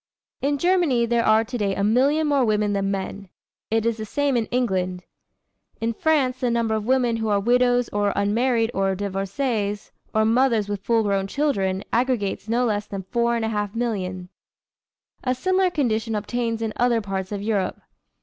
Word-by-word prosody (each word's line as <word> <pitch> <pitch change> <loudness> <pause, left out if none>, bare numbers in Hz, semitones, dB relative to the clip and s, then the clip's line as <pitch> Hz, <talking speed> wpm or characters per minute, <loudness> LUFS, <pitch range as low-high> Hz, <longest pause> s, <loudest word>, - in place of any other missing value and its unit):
In 285 +1 +1
Germany 340 -8 +2
there 235 0 +1
are 220 0 +4
to 245 +2 -5
day 200 -2 0
a 200 - -1
million 270 +9 +3
more 285 -3 +2
women 210 -2 +1
than 195 0 0
men. 195 0 -4 0.4
It 225 0 +1
is 230 -1 +1
the 220 - -5
same 285 +4 0
in 230 -3 0
England. 185 -7 -1 0.8
In 230 0 -1
France 265 -2 +1
the 250 -2 0
number 230 -2 0
of 215 0 -2
women 250 -3 +2
who 220 -1 -2
are 205 -1 +2
widows 245 +2 +3
or 205 -1 0
unmarried 225 +3 +1
or 195 0 0
divorcées 205 +2 -2 0.2
or 220 0 +2
mothers 230 -2 +2
with 205 -1 -3
full 230 +1 +2
grown 195 -2 0
children 195 -8 0
aggregates 230 -4 0
no 240 +2 +2
less 210 -2 -1
than 195 -1 -5
four 235 -1 +1
and 230 -1 -1
a - - -1
half 210 -1 -2
millions. 185 -6 -3 0.9
A 255 -1 0
similar 370 +6 +2
condition 230 -8 -1
obtains 230 +2 -2
in 220 -1 -2
other 240 -1 +3
parts 195 -2 -4
of 200 -1 -4
Europe. 210 -3 -1
225 Hz, 180 wpm, -23 LUFS, 205-245 Hz, 0.9 s, are